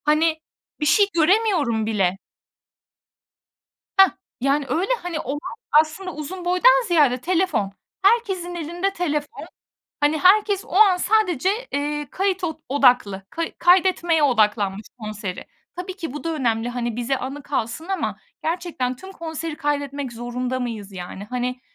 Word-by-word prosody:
Hani, 315 Hz, +2 st, +3 dB, 0.4 s
bir 300 Hz, -, -1 dB
şey 405 Hz, +7 st, +5 dB
göremiyorum 330 Hz, -, +2 dB
bile. 195 Hz, -4 st, +1 dB, 1.8 s
Heh, 385 Hz, 0 st, +8 dB, 0.3 s
yani, 275 Hz, +2 st, +1 dB
öyle, 365 Hz, +7 st, 0 dB
hani, 345 Hz, -3 st, -3 dB
olay 280 Hz, +2 st, -3 dB, 0.4 s
aslında 360 Hz, +4 st, -7 dB
uzun 345 Hz, +5 st, -6 dB
boydan -, -, +5 dB
ziyade 295 Hz, -8 st, +4 dB
telefon, 350 Hz, -, 0 dB, 0.3 s
herkesin 385 Hz, -5 st, +2 dB
elinde 345 Hz, +4 st, -2 dB
telefon. 305 Hz, 0 st, -3 dB, 0.6 s
Hani, 295 Hz, +2 st, +2 dB
herkes 400 Hz, +3 st, +4 dB
o -, -, -15 dB
an 390 Hz, -2 st, +6 dB
sadece, 370 Hz, -3 st, +2 dB, 0.2 s
eee, 295 Hz, 0 st, -2 dB
kayıt 380 Hz, -1 st, -1 dB
od 320 Hz, -2 st, -3 dB
odaklı, 245 Hz, -8 st, +3 dB
kay 330 Hz, 0 st, -3 dB
kaydetmeye 350 Hz, -3 st, +4 dB
odaklanmış, 210 Hz, -6 st, +2 dB
konseri. 210 Hz, -4 st, -6 dB, 0.3 s
Tabii 365 Hz, +1 st, -6 dB
ki 330 Hz, -7 st, -5 dB
bu 295 Hz, -, -7 dB
da 330 Hz, -, -1 dB
önemli, 235 Hz, -5 st, 0 dB
hani, 240 Hz, -2 st, -3 dB
bize 245 Hz, +3 st, -1 dB
anı 275 Hz, +3 st, -6 dB
kalsın 275 Hz, +3 st, -3 dB
ama 385 Hz, -1 st, -2 dB, 0.3 s
gerçekten 320 Hz, -7 st, -2 dB
tüm 380 Hz, +8 st, -11 dB
konseri 325 Hz, -2 st, -5 dB
kaydetmek 285 Hz, -3 st, -2 dB
zorunda 245 Hz, +2 st, -3 dB
mıyız, 220 Hz, -5 st, -5 dB
yani? 185 Hz, +1 st, -7 dB
Hani, 250 Hz, 0 st, -2 dB
300 Hz, 135 wpm, -22 LUFS, 250-360 Hz, 1.8 s, Heh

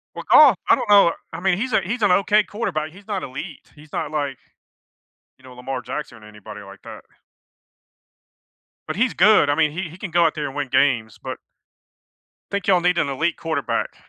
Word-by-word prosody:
Well, -, -, -8 dB
Goff 270 Hz, -, +8 dB
I -, -, +7 dB
don't -, -, -5 dB
know. 200 Hz, -5 st, +6 dB, 0.2 s
I 165 Hz, -, -5 dB
mean, 185 Hz, 0 st, +1 dB
he's 245 Hz, +2 st, -3 dB
a -, -, +3 dB
he's 220 Hz, +7 st, -4 dB
an 205 Hz, -3 st, +3 dB
okay 205 Hz, +3 st, +3 dB
quarterback. 180 Hz, -9 st, -4 dB
He's 195 Hz, +4 st, -17 dB
not 200 Hz, -3 st, -3 dB
elite. 145 Hz, +6 st, -9 dB
He's 150 Hz, 0 st, -17 dB
not 155 Hz, -1 st, -3 dB
like, 145 Hz, -4 st, -3 dB, 1.0 s
you 130 Hz, -, -25 dB
know, 130 Hz, -, -13 dB
Lamar 125 Hz, 0 st, -6 dB
Jackson 125 Hz, -3 st, -7 dB
or -, -, -14 dB
anybody 105 Hz, 0 st, -11 dB
like 100 Hz, 0 st, -14 dB
that -, -, -11 dB, 1.9 s
but -, -, -3 dB
he's 230 Hz, +4 st, +1 dB
good. 185 Hz, -6 st, +4 dB
I -, -, +2 dB
mean, 155 Hz, -1 st, +2 dB
he 175 Hz, +2 st, -5 dB
he 170 Hz, +4 st, -14 dB
can 195 Hz, -, -6 dB
go 170 Hz, +1 st, +3 dB
out 160 Hz, -, +1 dB
there 150 Hz, -2 st, -4 dB
and 135 Hz, -, -9 dB
win 145 Hz, -2 st, -3 dB
games, 125 Hz, -5 st, +1 dB
but -, -, -6 dB, 1.1 s
think 200 Hz, -1 st, -3 dB
y'all 180 Hz, -3 st, +4 dB
need 180 Hz, 0 st, +1 dB
an -, -, +1 dB
elite 160 Hz, +5 st, -1 dB
quarterback. 160 Hz, -4 st, -3 dB
160 Hz, 205 wpm, -21 LUFS, 135-195 Hz, 1.9 s, Goff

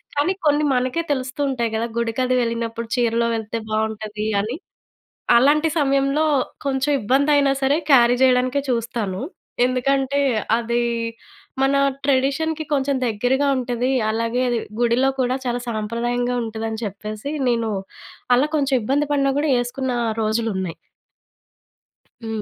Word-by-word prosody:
కానీ 295 Hz, +6 st, +2 dB
కొన్ని 295 Hz, 0 st, +3 dB
మనకే 255 Hz, +6 st, 0 dB
తెలుస్తూ 260 Hz, +1 st, -2 dB
ఉంటాయి 235 Hz, -3 st, -1 dB
కదా! 230 Hz, +2 st, -1 dB
గుడికది 250 Hz, +2 st, 0 dB
వెళ్ళినప్పుడు 230 Hz, -1 st, -3 dB
చీరలో 235 Hz, -1 st, +1 dB
వెళ్తే 220 Hz, 0 st, -4 dB
బాగుంటాది 215 Hz, -1 st, -2 dB, 0.2 s
అని. 225 Hz, +6 st, -3 dB, 0.8 s
అలాంటి 300 Hz, +5 st, +4 dB
సమయంలో 275 Hz, +2 st, +2 dB, 0.4 s
కొంచెం 270 Hz, +2 st, 0 dB
ఇబ్బందైనా 280 Hz, +4 st, +3 dB
సరే 280 Hz, +4 st, +3 dB
క్యారీ 245 Hz, -2 st, +6 dB
చేయడానికే 255 Hz, +2 st, +3 dB
చూస్తాను. 230 Hz, -5 st, -2 dB, 0.4 s
ఎందుకంటే 270 Hz, +2 st, +1 dB, 0.4 s
అది 235 Hz, +1 st, 0 dB, 0.8 s
మన 270 Hz, +1 st, +3 dB, 0.3 s
ట్రెడిషన్‍కి 285 Hz, +4 st, +1 dB
కొంచెం 275 Hz, 0 st, +1 dB
దగ్గరగా 245 Hz, +6 st, +1 dB
ఉంటది. 250 Hz, 0 st, -1 dB, 0.2 s
అలాగే 230 Hz, +2 st, -1 dB
అది 240 Hz, -, 0 dB, 0.2 s
గుడిలో 240 Hz, +3 st, +3 dB
కూడా 255 Hz, +1 st, 0 dB
చాలా 245 Hz, 0 st, -1 dB
సాంప్రదాయంగా 235 Hz, +3 st, -1 dB
ఉంటదని 220 Hz, 0 st, -4 dB
చెప్పేసి 215 Hz, +6 st, -6 dB, 0.2 s
నేను 230 Hz, -2 st, 0 dB, 0.6 s
అలా 265 Hz, +4 st, +3 dB
కొంచెం 275 Hz, -2 st, +1 dB
ఇబ్బంది 285 Hz, +6 st, +1 dB
పడినా 275 Hz, -1 st, +2 dB
కూడా 300 Hz, 0 st, 0 dB
ఏసుకున్న 255 Hz, +1 st, -3 dB, 0.3 s
రోజులు 225 Hz, +1 st, 0 dB
ఉన్నాయి. 185 Hz, -3 st, -3 dB, 1.5 s
హ్మ్. 220 Hz, -1 st, -3 dB
250 Hz, 120 wpm, -21 LUFS, 230-275 Hz, 1.5 s, క్యారీ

